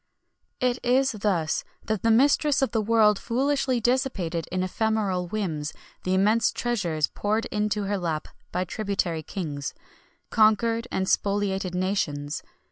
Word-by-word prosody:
It 250 0 +1
is 260 +2 +3
thus 190 -7 0 0.2
that 215 -3 -1
the 230 - +2
mistress 275 +4 +4
of 255 - +1
the 225 - +1
world 215 -1 +4
foolishly 265 0 +1
dissipated 220 - 0
in 185 0 0
ephemeral 195 -2 0
whims 165 -7 -3 0.3
the 185 +1 +2
immense 215 +4 +3
treasures 175 -11 0
poured 215 +7 -1
into 210 0 0
her 200 0 -1
lap 160 -3 -2 0.2
by 180 - 0
tributary 190 -4 -2
kings 145 -5 -5 0.6
conquered 225 +2 +3
and 190 - -1
spoliated 195 -2 0
nations. 155 -6 -1
205 Hz, 130 wpm, -26 LUFS, 180-230 Hz, 0.6 s, mistress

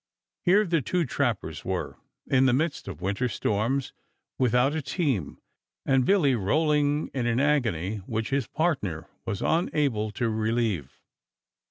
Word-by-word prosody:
Here 200 +4 +4
the 165 -4 +1
two 175 +5 0
trappers - - -2
were, - - -3 0.3
in 130 0 +3
the 125 - +3
midst 155 +4 -1
of 90 -4 -7
winter 100 +6 0
storms, 115 +6 -1 0.5
without 125 +3 +3
a 160 - -1
team, 135 - -1 0.5
and 130 -2 +3
Billy 175 -9 +4
rolling 145 +6 +1
in 125 -3 -1
an 120 +1 +1
agony 115 - +1
which 110 +4 -4
his 135 -3 0
partner 105 - -1 0.2
was 100 -4 -2
unable 145 - +1
to 120 - -1
relieve. 110 - -1
130 Hz, 140 wpm, -27 LUFS, 110-150 Hz, 0.5 s, Here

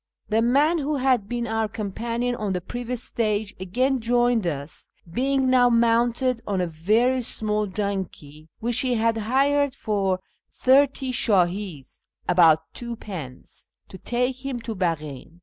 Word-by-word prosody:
The 220 +1 +2
man 285 +8 +3
who 295 +1 -1
had 255 -6 +1
been 240 -1 -2
our 225 -1 -1
companion 230 +4 -3
on 210 -5 -2
the 180 - -1
previous 245 +5 -5
stage 215 -2 -1
again 255 +9 0
joined 240 -3 +2
us, 145 -2 -5 0.2
being 265 +8 0
now 250 -1 +5
mounted 235 +1 +2
on 195 -2 0
a 180 - +1
very 215 +11 +1
small 215 -2 -1
donkey 185 -7 -5
which 235 +1 -1
he 255 -2 +1
had 230 0 +2
hired 270 +5 +1
for 195 -3 -1 0.3
thirty 265 0 +3
shdMs 185 - -1 0.2
(about 165 -3 +5
twopence) 200 - -8 0.2
to 190 - -11
take 250 +4 -2
him 270 -3 -3
to 225 - -5
Baghin. 160 -4 -4
225 Hz, 140 wpm, -24 LUFS, 190-250 Hz, 0.3 s, now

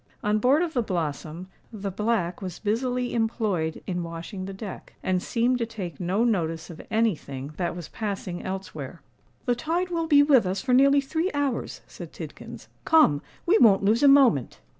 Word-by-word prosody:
On 210 +1 +2
board 270 +9 +4
of 335 -2 -3
the 245 - +1
Blossom, 170 -3 -4 0.2
the 200 -3 -5
Black 210 -3 -1
was 185 -3 -5
busily 245 +3 -1
employed 215 -8 -1
in 180 -1 -2
washing 170 +3 -6
the 195 - -6
deck, 195 0 -9
and 185 -1 +1
seemed 245 +4 +1
to 230 - -1
take 190 -9 -7
no 185 +5 0
notice 165 -8 -1
of 160 - -10
any 225 -3 +2
thing 140 0 -8
that 175 -2 -2
was 175 -3 -7
passing 195 -4 -4
elsewhere. 185 -5 -6 0.4
"The 245 - +2
tide 330 +9 -1
will 330 -1 -1
be 290 -2 +6
with 270 -9 +4
us 190 +2 -1
for 260 -1 -1
nearly 275 +2 +5
three 320 +6 -1
hours," 280 -4 -2
said - - -10
Tidkins. - - -9 0.2
"Come—we 320 - +3
won't 200 -4 +6
lose 215 +4 +3
a 285 - +6
moment." 260 - +4
210 Hz, 180 wpm, -26 LUFS, 175-250 Hz, 0.4 s, be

